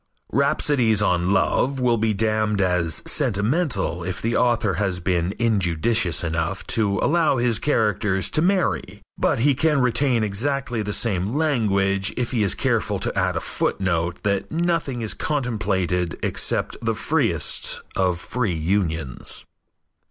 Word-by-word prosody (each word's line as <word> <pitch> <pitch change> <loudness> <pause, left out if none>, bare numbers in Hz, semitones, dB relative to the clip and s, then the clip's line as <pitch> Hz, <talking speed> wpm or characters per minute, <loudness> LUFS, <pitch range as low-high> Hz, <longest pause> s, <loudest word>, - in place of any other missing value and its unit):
Rhapsodies 130 -6 +2
on 90 -2 +1
love 135 +6 +1
will 120 -3 +2
be 110 0 +1
damned 110 0 0
as 90 -4 0
sentimental 100 - 0
if 95 +1 -4
the 115 +1 -1
author 120 -4 +2
has 95 -3 0
been 90 +1 -1
injudicious 100 -4 +1
enough 85 +3 -2
to 105 -3 +1
allow 160 -3 +2
his 120 -2 +2
characters 105 - 0
to 155 - +1
marry, 185 +1 0 0.2
but - - +1
he 145 +2 +4
can 150 +2 +1
retain 125 -1 +2
exactly 120 +3 -1
the 105 0 -3
same 100 -1 0
language 100 -10 +1
if 120 -1 -1
he 120 -4 0
is 100 -3 +2
careful - - 0
to - - -2
add - - 0
a - - +1
footnote 85 -2 -1
that 100 -1 -1
nothing 165 -7 -1
is 110 - 0
contemplated 95 - -1
except - - -1
the - - -1
freest - - 0
of 90 -3 +1
free 110 -3 -2
unions. 80 -5 -2
105 Hz, 140 wpm, -22 LUFS, 95-125 Hz, 0.2 s, he